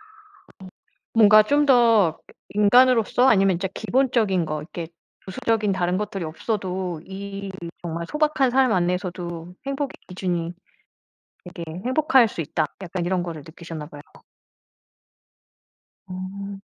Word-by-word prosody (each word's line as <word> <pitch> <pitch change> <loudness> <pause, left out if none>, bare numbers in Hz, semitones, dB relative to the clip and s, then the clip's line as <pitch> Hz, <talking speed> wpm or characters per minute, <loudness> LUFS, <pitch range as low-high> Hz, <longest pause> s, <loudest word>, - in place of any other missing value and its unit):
어. - - -20 1.1
뭔가 215 -1 +7
좀 290 +6 +2
더 230 - +4
그 - - -18 0.3
'인간으로서 245 +2 +5
아니면 195 -5 +4
진짜 185 +3 -2
기본적인 220 -5 +1
것 155 -1 -3
이렇게 165 +1 -7 0.4
부수적인 210 +2 0
다른 180 -1 0
것들이 200 -2 -3
없어도 185 0 -3
이 195 0 -7 0.3
정말 170 -1 -4
소박한 300 -4 +1
삶 260 -1 +3
안에서도 180 -1 -2
행복의 275 0 -3
기준이 175 -2 -3 1.0
되게 170 - -6 0.2
행복할 265 -2 +4
수 175 - -6
있다.' 155 +1 -1 0.2
약간 180 -1 -4
이런 180 0 0
거를 165 -3 -6
느끼셨나 165 -2 -8
봐요. 145 -1 -12 2.0
어. 195 +2 -7
190 Hz, 265 characters per minute, -23 LUFS, 175-230 Hz, 2.0 s, 뭔가